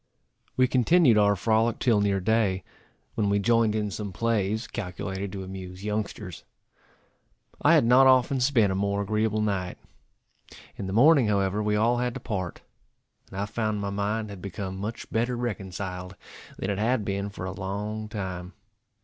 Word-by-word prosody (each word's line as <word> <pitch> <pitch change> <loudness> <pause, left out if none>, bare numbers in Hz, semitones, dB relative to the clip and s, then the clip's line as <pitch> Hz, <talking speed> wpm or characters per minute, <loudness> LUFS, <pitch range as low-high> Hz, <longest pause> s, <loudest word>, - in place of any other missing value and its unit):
We 130 0 +5
continued 130 -1 +4
our 100 0 +4
frolic 110 +3 +1
till 115 -5 +2
near 100 -1 +1
day, 100 -2 +1 0.5
when 105 -2 0
we 100 - +2
joined 115 +1 +2
in 105 -1 -1
some 100 0 -5
plays, 110 +1 0
calculated 95 -1 -5
to 95 -1 -5
amuse 95 0 -8
youngsters. 105 -3 -4 1.2
I - - +6
had - - +4
not 130 +3 +6
often 130 +1 +4
spent 125 -6 +3
a - - -1
more 100 +1 0
agreeable 110 +1 0
night. 95 -4 -2 1.0
In 95 - -5
the - - -4
morning, 135 +2 +6
however, 100 0 +1
we 105 0 +1
all 115 +3 +2
had 125 -1 -1
to - - -4
part; 95 -5 -4 0.7
and 95 - -7
I 100 - 0
found 110 0 -2
my 100 0 -3
mind 105 +2 -2
had 100 -3 -9
become 95 0 -5
much 105 +4 -5
better 120 +2 0
reconciled 95 -5 -5 0.4
than 95 - -2
it 100 - -2
had 115 0 +1
been 100 -1 -2
for 100 -2 -7
a 95 - -3
long 105 +3 -4
time. 95 -3 -5
105 Hz, 165 wpm, -26 LUFS, 95-115 Hz, 1.2 s, I